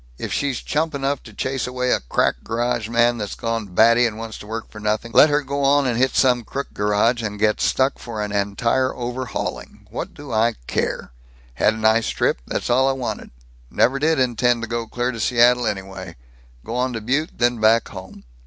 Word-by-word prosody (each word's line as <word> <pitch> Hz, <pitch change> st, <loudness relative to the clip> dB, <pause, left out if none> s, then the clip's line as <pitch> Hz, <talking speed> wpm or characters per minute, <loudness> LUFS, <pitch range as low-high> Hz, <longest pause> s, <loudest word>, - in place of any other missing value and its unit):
If -, -, -4 dB
she's 140 Hz, -3 st, -1 dB
chump 155 Hz, 0 st, -1 dB
enough 140 Hz, 0 st, -1 dB
to 110 Hz, -, -13 dB
chase 130 Hz, +5 st, -3 dB
away 125 Hz, 0 st, -1 dB
a -, -, +3 dB
crack -, -, 0 dB
garage 120 Hz, 0 st, -1 dB
man 120 Hz, 0 st, +2 dB
that's 105 Hz, -1 st, -4 dB
gone 115 Hz, -2 st, -3 dB
batty 115 Hz, +6 st, +4 dB
and 110 Hz, -2 st, -6 dB
wants 115 Hz, -1 st, -7 dB
to 105 Hz, -, -11 dB
work 110 Hz, +1 st, -5 dB
for 105 Hz, -, -10 dB
nothing, 105 Hz, +2 st, -2 dB
let 155 Hz, -, +7 dB
her 145 Hz, 0 st, +1 dB
go 140 Hz, +1 st, -3 dB
on 140 Hz, +1 st, +4 dB
and 125 Hz, -2 st, 0 dB
hit 130 Hz, +2 st, +1 dB
some 125 Hz, -2 st, +3 dB
crook 140 Hz, +5 st, -5 dB
garage 105 Hz, +4 st, +1 dB
and 105 Hz, -2 st, -4 dB
get 105 Hz, +1 st, +1 dB
stuck 130 Hz, +1 st, +1 dB
for 115 Hz, -2 st, -7 dB
an 105 Hz, -, -4 dB
entire 115 Hz, +6 st, 0 dB
overhauling. 125 Hz, +1 st, -5 dB
What -, -, -5 dB
do 145 Hz, -3 st, -10 dB
I 115 Hz, +1 st, +2 dB
care? -, -, -2 dB, 0.4 s
Had 105 Hz, -, +2 dB
nice 110 Hz, +1 st, +3 dB
trip; -, -, 0 dB
that's -, -, -3 dB
all 130 Hz, +2 st, +4 dB
I -, -, +1 dB
wanted. 130 Hz, -2 st, -5 dB, 0.4 s
Never 135 Hz, -, +2 dB
did 155 Hz, 0 st, +2 dB
intend 120 Hz, -1 st, +1 dB
to -, -, -3 dB
go 115 Hz, 0 st, -3 dB
clear 120 Hz, +2 st, -2 dB
to 115 Hz, -, -7 dB
Seattle, 120 Hz, +1 st, +3 dB
anyway. 95 Hz, -4 st, -5 dB, 0.5 s
Go -, -, -5 dB
on 125 Hz, 0 st, 0 dB
to 115 Hz, -, -4 dB
Butte, 140 Hz, +8 st, -1 dB
then 120 Hz, -1 st, +1 dB
back 110 Hz, +2 st, +3 dB
home. 95 Hz, -1 st, -10 dB
120 Hz, 205 wpm, -21 LUFS, 110-130 Hz, 0.5 s, let